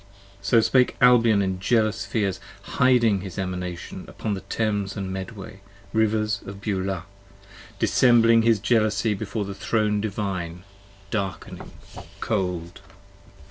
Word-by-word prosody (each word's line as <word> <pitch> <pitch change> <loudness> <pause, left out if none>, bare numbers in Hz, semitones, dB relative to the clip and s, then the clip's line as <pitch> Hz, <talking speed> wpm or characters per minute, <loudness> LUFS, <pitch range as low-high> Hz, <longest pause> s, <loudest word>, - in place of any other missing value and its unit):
So 115 - +4
spake 125 +2 +3
Albion 120 -5 +5
in 95 -1 -2
jealous 110 +1 +1
fears, 100 -6 -1 0.2
hiding 120 -6 +3
his 95 -2 -8
Emanation 90 -2 -5
Upon 105 - -4
the 95 - -4
Thames 100 0 -2
and 95 -1 -4
Medway, 95 0 -8 0.3
rivers 110 -2 +1
of 100 0 -9
Beulah: 95 -3 -2 0.7
dissembling 115 -2 +4
34 115 +1 +3
His 110 -3 +3
jealousy 110 0 +1
before 105 +1 -4
the 100 - -5
throne 105 0 0
divine, 95 -5 -4 0.5
darkening, 100 -3 -4 0.5
cold! 90 -5 -3
105 Hz, 120 wpm, -24 LUFS, 95-110 Hz, 0.7 s, Albion